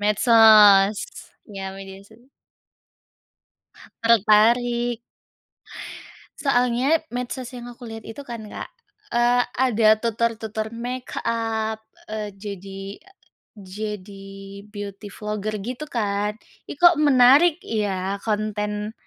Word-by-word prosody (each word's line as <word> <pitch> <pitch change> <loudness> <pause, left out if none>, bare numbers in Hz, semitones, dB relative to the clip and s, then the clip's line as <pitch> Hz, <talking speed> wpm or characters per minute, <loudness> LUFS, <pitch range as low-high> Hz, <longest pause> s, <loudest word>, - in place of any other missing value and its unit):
Medsos, 210 -2 +6 0.5
iya 195 -2 -7
media 195 0 -10
so 220 - -19 1.9
Tertarik. 235 +2 +3 1.4
Soalnya, 255 +3 +2
medsos 250 0 -5
yang 240 - -8
aku 240 -1 -11
lihat 225 -1 -9
itu, 225 +6 -9
kan, 235 -5 -8
Kak, 210 - -8 0.4
eee, 240 -2 +2 0.2
ada 225 -3 +3
tutor-tutor 220 -1 -2
makeup, 230 -2 -3 0.3
eee, 215 -1 -3
jadi 195 0 -8
a 390 +2 -22 0.4
jadi 195 0 -8 0.4
beauty 205 0 -8
vlogger 210 0 -4
gitu, 255 +6 -6
kan. 210 -3 -2 0.3
"Ih, - - -7
kok 345 -1 +5
menarik 290 +4 +6
ya, 200 -2 -2
konten, 210 0 -3
220 Hz, 95 wpm, -23 LUFS, 205-240 Hz, 1.9 s, Medsos